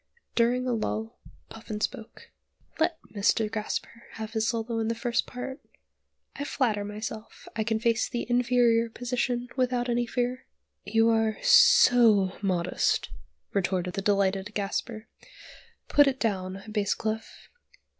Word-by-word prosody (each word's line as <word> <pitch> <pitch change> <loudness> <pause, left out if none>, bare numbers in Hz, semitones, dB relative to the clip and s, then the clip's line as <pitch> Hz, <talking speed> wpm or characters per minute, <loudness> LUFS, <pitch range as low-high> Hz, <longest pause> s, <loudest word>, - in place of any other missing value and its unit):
During 245 +2 +2
a 250 - +1
lull 220 0 -3 0.3
Puffin 220 -1 -7
spoke. 220 +1 -5 0.5
"Let 325 +1 +1 0.2
Mr. 210 +1 +1
Gasper 225 +2 -4
have 220 0 -7
his 220 0 0
solo 230 0 -2
in 220 - -1
the 230 - -1
first 235 0 -1
part. 260 +3 -6 0.8
I 285 - -4
flatter 230 -8 0
myself 215 +1 -7
I 220 - 0
can 225 0 0
face 230 -1 +1
the 240 - -3
inferior 240 -1 +3
position 245 +1 -2
without 250 -1 0
any 240 0 0
fear." 250 +2 -2 0.4
"You 225 0 +3
are 225 -1 +1
so 230 - +6
modest," 180 -4 0 0.4
retorted 180 -2 -1
the 195 - -2
delighted 200 0 0
Gasper. 215 +2 -3 0.8
"Put 290 -1 +5
it 265 -1 0
down, 195 -3 -2
Basscleff. 215 +1 -3
225 Hz, 130 wpm, -27 LUFS, 210-245 Hz, 0.8 s, so